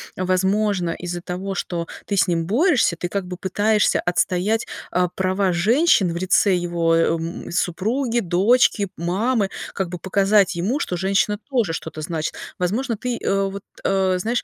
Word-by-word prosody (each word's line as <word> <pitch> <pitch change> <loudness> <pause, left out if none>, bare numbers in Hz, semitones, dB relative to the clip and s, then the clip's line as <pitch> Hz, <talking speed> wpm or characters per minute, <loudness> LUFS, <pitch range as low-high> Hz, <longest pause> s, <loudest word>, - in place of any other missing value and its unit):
возможно, 185 0 +1
из-за 175 +1 -5
того, 190 +2 -4
что 170 -2 -3 0.2
ты 200 - -2
с 195 - +3
ним 165 -2 0
борешься, 245 - +2
ты 175 +1 -4
как 200 -1 -2
бы 180 0 -7
пытаешься 205 +3 +1
отстоять, 185 +5 0 0.2
а, 180 0 +1
права 190 +1 0
женщин 200 - +3
в - - -7
лице 185 +2 +3
его, 170 -1 0
а, - - +4 0.2
м, 165 +2 -6
супруги, 225 +8 0
дочки, 205 +3 +3
мамы, 200 +5 0 0.2
как 190 -3 -2
бы 180 - -5
показать 195 +2 +2
ему, 205 +12 -1
что 180 - -2
женщина 195 +3 +1
тоже 235 -11 0
что-то 160 -1 -6
значит. 160 0 -3 0.2
Возможно, 225 +7 -1
ты, 245 +1 -3
э, 195 -2 0
вот, 200 0 -7 0.2
э, 190 -1 +2
знаешь, 230 +6 -1
190 Hz, 160 wpm, -22 LUFS, 175-210 Hz, 0.2 s, а